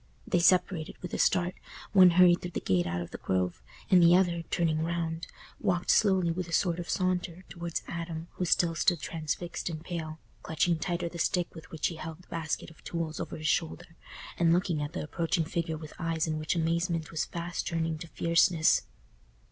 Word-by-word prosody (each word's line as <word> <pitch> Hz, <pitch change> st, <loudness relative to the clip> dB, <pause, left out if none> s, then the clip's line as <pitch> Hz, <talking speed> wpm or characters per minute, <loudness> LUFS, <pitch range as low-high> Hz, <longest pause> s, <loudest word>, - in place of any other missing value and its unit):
They -, -, +1 dB
separated 180 Hz, -2 st, +2 dB
with 180 Hz, -, -6 dB
a -, -, -2 dB
start—one 185 Hz, +1 st, +3 dB
hurried 180 Hz, -1 st, +6 dB
through 180 Hz, -, -4 dB
the 175 Hz, -, -3 dB
gate 90 Hz, -2 st, +1 dB
out 85 Hz, 0 st, -2 dB
of 85 Hz, -, -7 dB
the -, -, -7 dB
Grove, 90 Hz, -7 st, -1 dB, 0.3 s
and 185 Hz, -2 st, +7 dB
the 170 Hz, +1 st, +7 dB
other, 175 Hz, -2 st, +2 dB
turning 160 Hz, -2 st, +1 dB
round, 165 Hz, 0 st, -2 dB, 0.3 s
walked 180 Hz, -2 st, +1 dB
slowly, 190 Hz, -5 st, +3 dB
with 175 Hz, +1 st, -3 dB
a -, -, -9 dB
sort 175 Hz, 0 st, +1 dB
of 175 Hz, -, -6 dB
saunter, 180 Hz, -1 st, -1 dB
towards 170 Hz, -1 st, -4 dB
Adam 165 Hz, -1 st, -5 dB
who 180 Hz, -, -3 dB
still 170 Hz, 0 st, +3 dB
stood 170 Hz, +1 st, +2 dB
transfixed 165 Hz, +3 st, -4 dB
and 155 Hz, -1 st, -6 dB
pale, 160 Hz, -3 st, -5 dB, 0.2 s
clutching 160 Hz, +1 st, 0 dB
tighter 175 Hz, +1 st, -2 dB
the 170 Hz, 0 st, -7 dB
stick 175 Hz, +1 st, 0 dB
with 160 Hz, -, -11 dB
which 160 Hz, -2 st, -3 dB
he 165 Hz, -, -1 dB
held 165 Hz, +2 st, -8 dB
the -, -, -24 dB
basket 165 Hz, -1 st, -3 dB
of 160 Hz, -, -20 dB
tools 165 Hz, -2 st, -4 dB
over -, -, -5 dB
his 155 Hz, 0 st, -3 dB
shoulder, 80 Hz, -, -1 dB, 0.4 s
and 170 Hz, -1 st, +4 dB
looking 170 Hz, -3 st, +1 dB
at 145 Hz, +2 st, -4 dB
the -, -, -3 dB
approaching 165 Hz, +2 st, -1 dB
figure 165 Hz, 0 st, -2 dB
with 155 Hz, -1 st, -10 dB
eyes 165 Hz, -2 st, 0 dB
in 155 Hz, -1 st, -2 dB
which 155 Hz, +3 st, -1 dB
amazement 165 Hz, 0 st, 0 dB
was 160 Hz, -, -1 dB
fast 170 Hz, 0 st, -4 dB
turning 165 Hz, -1 st, -1 dB
to 170 Hz, -, -7 dB
fierceness. 165 Hz, 0 st, +3 dB
170 Hz, 195 wpm, -29 LUFS, 160-175 Hz, 0.4 s, and